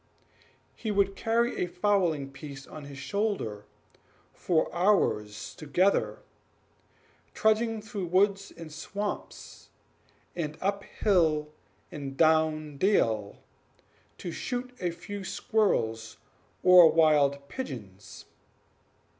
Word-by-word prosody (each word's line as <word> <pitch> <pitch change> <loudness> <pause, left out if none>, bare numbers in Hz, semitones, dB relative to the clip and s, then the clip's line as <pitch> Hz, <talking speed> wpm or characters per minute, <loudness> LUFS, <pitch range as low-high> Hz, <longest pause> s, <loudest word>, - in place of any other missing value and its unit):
He 220 - -5
would 200 -1 +2
carry 235 0 0
a - - -2
fowling 175 -7 0
piece 135 0 -9
on 155 -2 -10
his 140 -1 -10
shoulder 140 - -2 0.7
for 165 -3 0
hours 170 - +1
together, 175 +6 0 1.1
trudging 220 0 +1
through 210 -5 -5
woods 195 +2 +2
and 165 -2 -9
swamps, 205 +6 -6 0.7
and 155 -3 -4
up 200 +1 -1
hill 155 -6 +1 0.4
and 135 -2 -7
down 155 -2 +2
dale, 115 - +1 0.7
to 175 - -6
shoot 250 +6 -4
a 180 - -1
few 200 +4 -7
squirrels 115 - 0 0.5
or 180 -3 +8
wild 145 -3 +3
pigeons. 105 - -8
170 Hz, 95 wpm, -28 LUFS, 140-200 Hz, 1.1 s, or